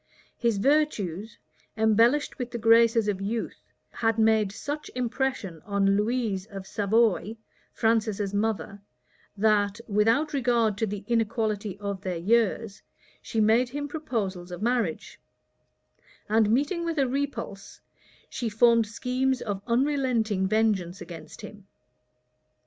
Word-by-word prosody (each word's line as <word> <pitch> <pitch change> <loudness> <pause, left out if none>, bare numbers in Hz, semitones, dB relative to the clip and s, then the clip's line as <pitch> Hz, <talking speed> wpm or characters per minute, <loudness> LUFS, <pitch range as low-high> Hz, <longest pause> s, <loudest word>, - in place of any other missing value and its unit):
His 235 -4 0
virtues, 220 - 0 0.4
embellished 230 +8 +3
with 250 -1 -3
the 240 - -5
graces 230 -1 +4
of 195 -2 -1
youth, 220 +3 -3 0.3
had 225 -1 0
made 220 -2 +3
such 290 +8 -5
impression 245 - -2
on 200 -1 +1
Louise 210 -2 -1
of 195 -3 -8
Savoy, 215 +1 +1 0.3
Francis's 215 -3 0
mother, 205 -2 -2 0.6
that, 205 0 +2
without 225 +9 +2
regard 235 -5 +2
to 225 - +1
the 205 0 -5
inequality 215 -3 -1
of 200 -2 -4
their 185 -3 -3
years, 215 +2 0 0.4
she 225 - -3
made 225 +4 +3
him 290 +3 -4
proposals 215 - -4
of 175 +3 -6
marriage; 235 -8 -1 1.1
and 220 0 +3
meeting 290 - +1
with 335 -1 -2
a 275 -2 +2
repulse, 250 -7 -4 0.5
she 235 - -3
formed 230 +1 +4
schemes 255 +4 -1
of 200 -4 -4
unrelenting 240 -6 +1
vengeance 200 -4 0
against 160 -3 -10
him. 205 -1 -11
220 Hz, 120 wpm, -26 LUFS, 200-240 Hz, 1.1 s, graces